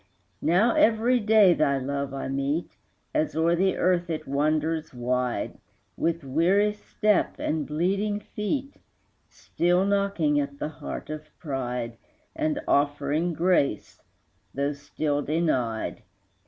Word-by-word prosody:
Now 200 Hz, +8 st, +3 dB
every 230 Hz, +3 st, +3 dB
day 210 Hz, -4 st, +6 dB
thy 140 Hz, -4 st, +2 dB
love 140 Hz, +1 st, -3 dB
I 135 Hz, -1 st, -4 dB
meet, 140 Hz, +5 st, -2 dB, 0.4 s
As 305 Hz, -1 st, 0 dB
o'er 165 Hz, +2 st, +3 dB
the 190 Hz, +2 st, +1 dB
earth 175 Hz, -1 st, +1 dB
it 155 Hz, -1 st, -4 dB
wanders 155 Hz, +2 st, 0 dB
wide, 125 Hz, 0 st, -2 dB, 0.4 s
With 165 Hz, -1 st, -1 dB
weary 180 Hz, +10 st, +2 dB
step 210 Hz, -1 st, 0 dB
and 155 Hz, -2 st, -2 dB
bleeding 195 Hz, +7 st, 0 dB
feet, 215 Hz, +7 st, -4 dB, 0.5 s
Still 175 Hz, +2 st, 0 dB
knocking 200 Hz, -7 st, +1 dB
at 140 Hz, 0 st, -3 dB
the 150 Hz, -, -3 dB
heart 155 Hz, -, -7 dB
of 155 Hz, 0 st, -7 dB
pride 125 Hz, -5 st, -4 dB, 0.4 s
And 310 Hz, -2 st, 0 dB
offering 145 Hz, +4 st, +1 dB
grace, 165 Hz, -, +1 dB, 0.5 s
though 140 Hz, +2 st, 0 dB
still 145 Hz, +1 st, -2 dB
denied. 135 Hz, -8 st, -1 dB
160 Hz, 120 wpm, -26 LUFS, 140-195 Hz, 0.5 s, day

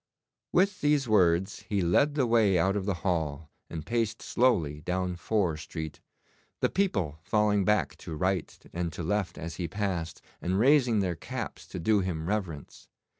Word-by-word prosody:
With 190 Hz, +2 st, +2 dB
these 145 Hz, -3 st, +2 dB
words 95 Hz, -4 st, +2 dB
he 100 Hz, -3 st, +1 dB
led 140 Hz, -, +3 dB
the 140 Hz, -4 st, +2 dB
way 110 Hz, -5 st, +4 dB
out 95 Hz, +4 st, +2 dB
of 100 Hz, -1 st, -2 dB
the 100 Hz, -, +1 dB
hall 80 Hz, -4 st, -1 dB, 0.2 s
and 80 Hz, -2 st, -6 dB
paced 115 Hz, -1 st, -1 dB
slowly 85 Hz, -, +1 dB
down 90 Hz, +1 st, -1 dB
Fore 90 Hz, -3 st, 0 dB
Street, 80 Hz, 0 st, -7 dB, 0.6 s
the -, -, +2 dB
people 95 Hz, -, 0 dB
falling 105 Hz, +1 st, +2 dB
back 105 Hz, +1 st, +2 dB
to 80 Hz, -, -7 dB
right 90 Hz, +1 st, -1 dB, 0.2 s
and 85 Hz, -1 st, -2 dB
to 85 Hz, -, -5 dB
left 90 Hz, 0 st, -1 dB
as 80 Hz, 0 st, -6 dB
he 90 Hz, -, -2 dB
passed, 90 Hz, -5 st, -3 dB, 0.2 s
and 90 Hz, +2 st, 0 dB
raising 125 Hz, -2 st, +4 dB
their 90 Hz, -2 st, 0 dB
caps 80 Hz, -, -6 dB
to -, -, -6 dB
do 105 Hz, +5 st, +3 dB
him 90 Hz, -4 st, -2 dB
reverence. 90 Hz, -8 st, -4 dB
95 Hz, 170 wpm, -29 LUFS, 85-110 Hz, 0.6 s, way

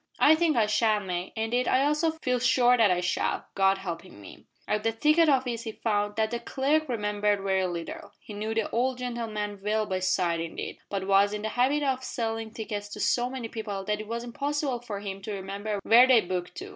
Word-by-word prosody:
"I 305 Hz, -, +6 dB
think 315 Hz, -3 st, +2 dB
I 220 Hz, -, +4 dB
shall, 215 Hz, 0 st, +2 dB
May. 180 Hz, -2 st, -4 dB
Indeed 230 Hz, +3 st, 0 dB
I 260 Hz, -, +3 dB
also 300 Hz, +3 st, +2 dB
feel 250 Hz, -1 st, +1 dB
sure 250 Hz, 0 st, +4 dB
that 225 Hz, -4 st, +4 dB
I 180 Hz, -1 st, +1 dB
shall 180 Hz, +1 st, -1 dB
God 195 Hz, 0 st, +3 dB
helping 175 Hz, -, -7 dB
me." 100 Hz, -, -13 dB, 0.2 s
At 210 Hz, 0 st, 0 dB
the 225 Hz, +1 st, +1 dB
ticket 305 Hz, +8 st, +3 dB
office 255 Hz, -4 st, +1 dB
he 225 Hz, -2 st, -6 dB
found 205 Hz, -2 st, -1 dB
that 220 Hz, 0 st, 0 dB
the 235 Hz, -, -2 dB
clerk 290 Hz, +5 st, 0 dB
remembered 210 Hz, -3 st, 0 dB
very 190 Hz, -1 st, +1 dB
little. 170 Hz, -2 st, -6 dB
He 210 Hz, -, -11 dB
knew 215 Hz, +2 st, -3 dB
the 225 Hz, -2 st, 0 dB
old 250 Hz, +2 st, 0 dB
gentleman 220 Hz, -5 st, -4 dB
well 215 Hz, +1 st, 0 dB
by 190 Hz, -2 st, -2 dB
sight, 180 Hz, -2 st, +1 dB
indeed, 165 Hz, 0 st, -5 dB
but 195 Hz, -1 st, -3 dB
was 200 Hz, +1 st, +4 dB
in 210 Hz, -, -5 dB
the 220 Hz, -, -1 dB
habit 265 Hz, +6 st, +1 dB
of 260 Hz, -2 st, 0 dB
selling 225 Hz, -2 st, -3 dB
tickets 210 Hz, -2 st, -5 dB
to -, -, -7 dB
so 245 Hz, +3 st, +1 dB
many 255 Hz, -3 st, -5 dB
people 210 Hz, -4 st, -5 dB
that 210 Hz, +1 st, -1 dB
it 215 Hz, -, -9 dB
was 235 Hz, +1 st, -4 dB
impossible 280 Hz, +1 st, -2 dB
for 215 Hz, -4 st, -6 dB
him 195 Hz, -1 st, -6 dB
to 210 Hz, +2 st, -5 dB
remember 200 Hz, +2 st, -4 dB
where 240 Hz, +3 st, +7 dB
they 250 Hz, -4 st, +6 dB
booked 180 Hz, -, -4 dB
to. 385 Hz, +3 st, -7 dB
220 Hz, 220 wpm, -27 LUFS, 200-250 Hz, 0.2 s, where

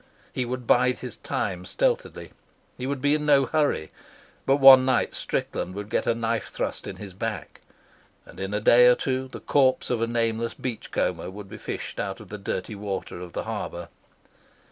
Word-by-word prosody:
He 125 Hz, -, -1 dB
would 125 Hz, 0 st, -4 dB
bide 125 Hz, +2 st, +3 dB
his -, -, -8 dB
time -, -, -3 dB
stealthily. -, -, -1 dB, 0.4 s
He 125 Hz, -, -5 dB
would 140 Hz, -1 st, -2 dB
be 145 Hz, +1 st, +3 dB
in 150 Hz, 0 st, 0 dB
no 140 Hz, -2 st, +5 dB
hurry, 145 Hz, -, 0 dB, 0.6 s
but 135 Hz, -, +5 dB
one 135 Hz, -2 st, +9 dB
night 130 Hz, -1 st, +1 dB
Strickland 90 Hz, +1 st, -3 dB
would 105 Hz, +1 st, -6 dB
get -, -, 0 dB
a 115 Hz, -, +3 dB
knife 115 Hz, 0 st, -1 dB
thrust -, -, -4 dB
in -, -, -5 dB
his 100 Hz, -3 st, -9 dB
back, 95 Hz, -, -5 dB, 0.6 s
and -, -, -14 dB
in 95 Hz, +1 st, -3 dB
a 105 Hz, -, 0 dB
day 120 Hz, +3 st, +7 dB
or 125 Hz, -, +7 dB
two 130 Hz, 0 st, -2 dB
the 130 Hz, -, -9 dB
corpse 130 Hz, -3 st, +2 dB
of 120 Hz, -2 st, 0 dB
a 115 Hz, -, +1 dB
nameless 115 Hz, 0 st, -1 dB
beach 125 Hz, -4 st, -5 dB
comber -, -, -1 dB
would 100 Hz, +1 st, -9 dB
be -, -, -9 dB
fished -, -, -5 dB
out 95 Hz, 0 st, -3 dB
of 105 Hz, -, -12 dB
the 105 Hz, -, -7 dB
dirty 100 Hz, +1 st, -4 dB
water 100 Hz, -3 st, -5 dB
of 90 Hz, -1 st, -9 dB
the -, -, -3 dB
harbour. 85 Hz, 0 st, -5 dB
120 Hz, 195 wpm, -25 LUFS, 105-130 Hz, 0.6 s, one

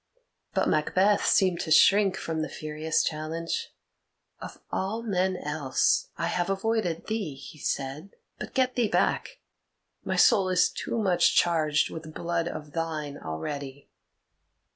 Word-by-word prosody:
But -, -, +2 dB
Macbeth 190 Hz, +7 st, +2 dB
seemed 185 Hz, -3 st, +3 dB
to -, -, -4 dB
shrink 195 Hz, +4 st, +5 dB
from 160 Hz, -1 st, -3 dB
the 155 Hz, -, -3 dB
furious 155 Hz, +2 st, -1 dB
challenge. 160 Hz, +2 st, -3 dB, 0.7 s
"Of -, -, -9 dB
all 215 Hz, +5 st, -2 dB
men 190 Hz, -3 st, 0 dB
else 150 Hz, -4 st, 0 dB
I -, -, -1 dB
have 175 Hz, +1 st, -1 dB
avoided 195 Hz, -4 st, -1 dB
thee," 210 Hz, -10 st, -3 dB
he 140 Hz, +3 st, -12 dB
said. 140 Hz, +8 st, -4 dB, 0.2 s
"But -, -, -7 dB
get 255 Hz, -1 st, +2 dB
thee 240 Hz, -3 st, +1 dB
back; -, -, 0 dB, 0.6 s
my -, -, -2 dB
soul 190 Hz, -2 st, +5 dB
is 180 Hz, -1 st, +3 dB
too -, -, -4 dB
much 190 Hz, -5 st, +3 dB
charged 155 Hz, -3 st, +2 dB
with 160 Hz, -1 st, -8 dB
blood 170 Hz, 0 st, -1 dB
of 150 Hz, -3 st, -7 dB
thine 155 Hz, -3 st, -4 dB
already." 135 Hz, -, -6 dB
165 Hz, 140 wpm, -27 LUFS, 155-195 Hz, 0.7 s, shrink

